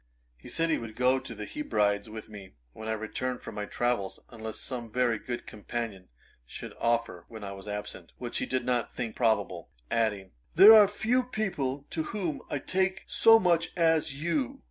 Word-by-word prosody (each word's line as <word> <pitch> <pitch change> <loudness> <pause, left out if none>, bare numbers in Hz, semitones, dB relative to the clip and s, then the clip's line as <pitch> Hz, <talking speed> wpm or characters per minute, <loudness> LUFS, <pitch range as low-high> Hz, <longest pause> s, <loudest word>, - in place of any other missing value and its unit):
He 60 - -13
said 165 0 +1
he - - +2
would 115 -2 -8
go 125 +2 +3
to 130 -3 -9
the 105 0 -6
Hebrides 105 -6 0
with 110 0 -8
me, 100 -3 -11 0.2
when 110 - -8
I 110 - 0
returned 125 +4 -3
from - - -7
my 105 - -4
travels, 120 -4 -1
unless 110 -2 -6
some 120 -4 -5
very 120 -2 +1
good 120 -2 -5
companion 105 -3 -5 0.4
should - - -8
offer 115 -7 0
when 110 -2 -10
I 100 - -5
was 95 +1 -9
absent, 105 0 -6
which - - -3
he - - -2
did 130 0 -1
not 125 -2 0
think 115 -3 -4
probable; 115 -3 0 0.2
adding, 105 -4 0 0.2
'There 200 +6 +11
are 210 -2 +9
few 220 +5 +1
people 145 - -2
to 160 - -1 0.2
whom 170 -7 -2
I - - -1
take 190 +5 0
so 225 0 +6
much 170 -5 +1
to - - -7
as 160 -3 +3
you.' 260 - -1
120 Hz, 190 wpm, -29 LUFS, 110-165 Hz, 0.4 s, There